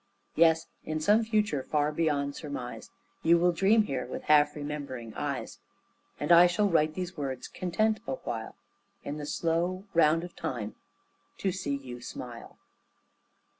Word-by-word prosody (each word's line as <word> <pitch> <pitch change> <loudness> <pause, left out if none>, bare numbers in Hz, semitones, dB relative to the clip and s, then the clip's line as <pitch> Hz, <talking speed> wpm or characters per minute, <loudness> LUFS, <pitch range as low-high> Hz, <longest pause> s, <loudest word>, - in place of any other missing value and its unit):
Yes, 165 0 +4 0.2
in 155 0 -2
some 210 +8 +4
future 215 -9 +1
far 150 +2 0
beyond 145 -3 0
surmise 140 -5 -6 0.3
You 170 +1 +5
will 175 +1 +4
dream 200 +5 +4
here 135 -10 -2
with - - -6
half 150 -1 +4
remembering 145 -6 -5
eyes, - - -4 0.6
And 145 - -1
I 170 +1 +9
shall 205 +4 +2
write 155 -4 +2
these 180 -1 -4
words, 135 -3 -4
content 215 +4 0
awhile 120 -4 -4 0.5
In 145 - -4
the 145 -1 -5
slow 175 +5 -1
round 165 0 +4
of 175 - -9
time 120 -9 -4 0.6
to 195 - 0
see 180 -7 -2
you 125 -3 -8
smile. 120 -1 -8
155 Hz, 145 wpm, -29 LUFS, 140-175 Hz, 0.6 s, I